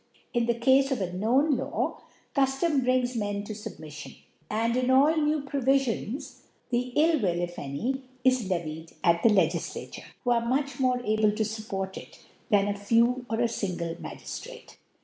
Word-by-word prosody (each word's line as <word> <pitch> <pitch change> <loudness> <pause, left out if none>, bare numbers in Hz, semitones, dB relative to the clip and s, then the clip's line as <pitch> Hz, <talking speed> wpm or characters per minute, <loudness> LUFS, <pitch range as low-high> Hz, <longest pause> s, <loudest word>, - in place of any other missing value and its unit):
In 240 -2 +1
ih^ 235 0 0
Cafe 265 +3 +5
of 265 - 0
a 190 - -1
fcnown 245 - +2
Law, - - -2 0.3
Cuftom 270 +1 +2
brings 250 0 +1
Men 205 -2 -2
to 215 - -6
Submiflion; 155 -8 -9 0.3
and 230 +2 0
in 255 0 +1
all 280 +5 +5
new 305 -1 +1
Provifions, 270 -3 -1 0.3
the 245 +1 0
Ill 315 +1 +4
will, 175 -4 +1
if 175 0 -4
any, 230 - -3 0.2
is 255 -6 +3
levelled 160 -2 -3
at 170 0 +4
the 230 - +6
LegiQa 175 -5 0
tare, - - -9 0.2
who 245 - +1
are 235 -1 +3
much 270 +2 -1
more 250 -1 +2
able 215 0 +3
to 220 +1 0
fupport 205 -3 -4
it - - -11 0.3
than 205 -3 +4
a 205 - -1
few, 235 +4 +2
or 225 0 -1
a 240 - +4
fingle 180 -7 -3
Magiftrate. - - -9
235 Hz, 170 wpm, -27 LUFS, 200-265 Hz, 0.3 s, the